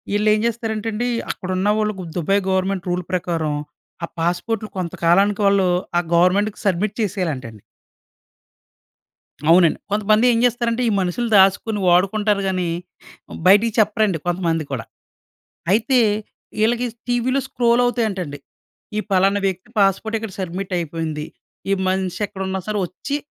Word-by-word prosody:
ఇళ్ళేం 210 Hz, +1 st, +3 dB
చేస్తారంటండి. 225 Hz, 0 st, -2 dB, 0.2 s
అక్కడున్నవాళ్ళుకు 200 Hz, +2 st, -1 dB
'Dubai' 195 Hz, +4 st, +1 dB
government 190 Hz, -1 st, -1 dB
rule 180 Hz, 0 st, -1 dB
ప్రకారం. 165 Hz, -4 st, -1 dB, 0.5 s
ఆ -, -, -13 dB
పాస్‌పోర్ట్‌లు 200 Hz, +6 st, -1 dB
కొంతకాలానికి 185 Hz, +4 st, +2 dB
వాళ్ళు 200 Hz, -2 st, +3 dB, 0.3 s
ఆ -, -, +5 dB
గవర్నమెంట్‌కి 190 Hz, +5 st, +3 dB
సబ్మిట్ 200 Hz, +2 st, 0 dB
చేసేయాలంటండి. 155 Hz, -, -3 dB, 1.9 s
అవునండి. 170 Hz, -1 st, +5 dB
కొంతమంది 215 Hz, +2 st, +3 dB
ఏం 230 Hz, -, +1 dB
చేస్తారంటే, 240 Hz, 0 st, 0 dB
ఈ -, -, +1 dB
మనుషులు 190 Hz, +6 st, -1 dB
దాసుకొని 200 Hz, +3 st, +3 dB
వాడుకుంటారు 200 Hz, +3 st, +3 dB
గాని, 185 Hz, -2 st, -1 dB, 0.8 s
బయటికి 205 Hz, +3 st, +5 dB
చెప్పరండి. 215 Hz, -4 st, +2 dB
కొంతమంది 170 Hz, -2 st, 0 dB
కూడా. 125 Hz, -4 st, -4 dB, 0.9 s
అయితే 235 Hz, +5 st, +3 dB, 0.6 s
ఇళ్ళకి 240 Hz, +2 st, +1 dB, 0.2 s
టీవీ‌లో 245 Hz, +2 st, +1 dB
స్క్రోల్ 240 Hz, -1 st, +2 dB
అవుతాయంటండి. 195 Hz, -, -2 dB, 0.6 s
ఈ -, -, +2 dB
పలానా 195 Hz, +2 st, +3 dB
వ్యక్తి 185 Hz, +1 st, -5 dB
పాస్‌పోర్ట్‌ 200 Hz, +3 st, +2 dB
ఇక్కడ 220 Hz, -3 st, -7 dB
సబ్మిట్ 185 Hz, +1 st, -4 dB
అయిపోయింది. 160 Hz, -2 st, -3 dB, 0.5 s
ఈ -, -, +5 dB
మనిషి 185 Hz, -1 st, -1 dB
ఎక్కడున్నా 190 Hz, 0 st, -4 dB
సరే 210 Hz, -1 st, -1 dB
ఒచ్చి, 280 Hz, -, -4 dB
195 Hz, 115 wpm, -21 LUFS, 180-215 Hz, 1.9 s, ఆ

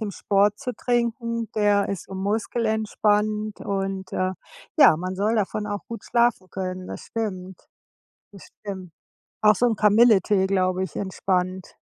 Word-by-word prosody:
dem 215 Hz, -2 st, -3 dB
Sport 200 Hz, +1 st, +1 dB
zu 255 Hz, -2 st, -4 dB
trinken. 235 Hz, -1 st, -1 dB
Der 205 Hz, -2 st, +2 dB
ist 195 Hz, -, -4 dB
so 190 Hz, -, -10 dB
muskelentspannend 215 Hz, 0 st, 0 dB
und, 195 Hz, -1 st, -3 dB
äh, 185 Hz, 0 st, 0 dB, 0.5 s
ja, 280 Hz, -, +8 dB
man 185 Hz, +3 st, -4 dB
soll 210 Hz, +4 st, +1 dB
davon 210 Hz, 0 st, -1 dB
auch 205 Hz, -1 st, -4 dB
gut 230 Hz, -, -7 dB
schlafen 235 Hz, -6 st, +1 dB
können. 185 Hz, -1 st, -5 dB
Das -, -, -7 dB
stimmt. 190 Hz, -5 st, -5 dB, 0.7 s
Das 195 Hz, -, -13 dB, 0.2 s
stimmt. 190 Hz, -4 st, -7 dB, 0.5 s
Auch 210 Hz, 0 st, +6 dB
so 245 Hz, -, +2 dB
'n 225 Hz, -3 st, +1 dB
Kamilletee, 210 Hz, -2 st, +4 dB
glaube 185 Hz, -1 st, +1 dB
ich, -, -, -9 dB
entspannt. 185 Hz, -1 st, -2 dB
205 Hz, 145 wpm, -24 LUFS, 190-220 Hz, 0.7 s, ja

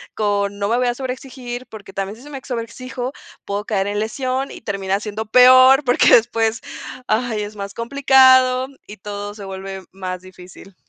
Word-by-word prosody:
con: 205 Hz, -1 st, 0 dB
"No 200 Hz, -, 0 dB
me 235 Hz, -, +2 dB
voy 250 Hz, 0 st, +1 dB
a 240 Hz, -, +1 dB
sobre 260 Hz, 0 st, -3 dB
exigir, 255 Hz, -1 st, -8 dB
porque 200 Hz, -3 st, -12 dB
también 195 Hz, +1 st, -4 dB
si 240 Hz, -, -15 dB
se 295 Hz, -, -12 dB
me 270 Hz, -2 st, -7 dB
sobre 240 Hz, -4 st, -3 dB
exijo, 255 Hz, +2 st, -6 dB, 0.3 s
puedo 200 Hz, +1 st, -3 dB
caer 195 Hz, -4 st, 0 dB
en 205 Hz, 0 st, -2 dB
lesión 255 Hz, +4 st, -2 dB
y -, -, -10 dB
termina 195 Hz, -2 st, -2 dB
siendo 215 Hz, +1 st, -5 dB
peor, 255 Hz, +3 st, +7 dB
porque 245 Hz, -2 st, +5 dB
después, 225 Hz, -1 st, +1 dB, 0.5 s
ay, 220 Hz, -1 st, 0 dB
es 205 Hz, +1 st, -8 dB
más 200 Hz, -1 st, -6 dB
complicado 260 Hz, 0 st, +4 dB, 0.2 s
y 210 Hz, -, -10 dB
todo 205 Hz, +1 st, -6 dB
se 205 Hz, -2 st, -9 dB
vuelve 190 Hz, 0 st, -7 dB
más 185 Hz, -1 st, -6 dB
difícil". 185 Hz, +1 st, -14 dB
220 Hz, 185 wpm, -20 LUFS, 200-255 Hz, 0.5 s, peor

